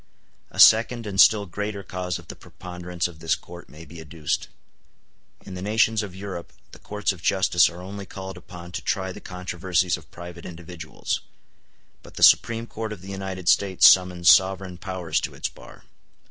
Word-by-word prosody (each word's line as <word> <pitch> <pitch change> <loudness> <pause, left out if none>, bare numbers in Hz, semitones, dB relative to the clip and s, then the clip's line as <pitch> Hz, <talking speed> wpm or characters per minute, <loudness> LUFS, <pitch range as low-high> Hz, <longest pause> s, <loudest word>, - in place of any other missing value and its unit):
A - - -10
second 115 +1 +6
and 100 -2 +3
still 105 -2 +5
greater 100 +2 -5
cause 90 -2 -4
of - - -14
the - - -8
preponderance 90 -2 -5
of 85 -3 -13
this 80 -1 +1
court 85 0 -13
may 80 +2 -12
be 80 +1 -11
adduced. 80 -1 -3 1.0
In 95 - -9
the 90 - -6
nations 110 +2 +2
of 100 -3 -7
Europe 95 -3 -7 0.2
the - - -13
courts 105 -1 -2
of 90 - -14
justice 90 -2 +3
are 85 +1 -10
only 100 +1 -8
called 95 0 -8
upon 85 -1 -11
to - - -5
try 95 -1 -2
the - - -10
controversies 90 -1 -1
of 80 -3 -17
private 85 +1 -10
individuals; 85 -2 -5 0.8
but - - -16
the - - -2
Supreme 115 -1 +5
Court 110 -1 -6
of 95 -4 -8
the 100 - -8
United 95 -2 -6
States 95 -1 +5
summons 90 -2 +4
sovereign 95 +1 +4
powers 95 -4 -2
to - - -5
its - - -3
bar. - - -15
90 Hz, 180 wpm, -24 LUFS, 85-100 Hz, 1.0 s, second